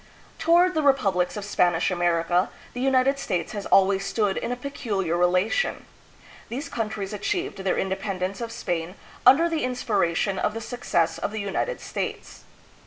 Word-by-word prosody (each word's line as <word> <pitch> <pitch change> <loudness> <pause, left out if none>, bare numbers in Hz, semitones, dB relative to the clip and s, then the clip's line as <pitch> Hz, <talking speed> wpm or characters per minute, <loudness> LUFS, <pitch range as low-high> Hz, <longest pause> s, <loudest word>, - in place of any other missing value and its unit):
Toward 345 +3 +4
the 315 - +1
republics 210 -11 +2
of 205 - -5
Spanish 175 -3 +2
America 175 0 +1 0.2
the 245 - -4
United 265 +1 +3
States 175 -10 -2
has 205 -2 -5
always 195 0 +4
stood 205 -1 0
in 235 - -3
a - - 0
peculiar 215 - -2
relation. 180 - +1 0.6
These 280 +5 -5
countries 215 -5 -3
achieved 345 - -2
their 190 -1 0
independence 190 +1 -2
of 230 -1 -4
Spain 175 -4 -3 0.3
under 290 +7 +7
the 325 -2 -1
inspiration 200 -7 0
of 210 - 0
the - - -2
success 175 -8 -1
of - - -2
the 215 +1 -5
United 205 - -2
States. - - -5
205 Hz, 155 wpm, -25 LUFS, 185-255 Hz, 0.6 s, under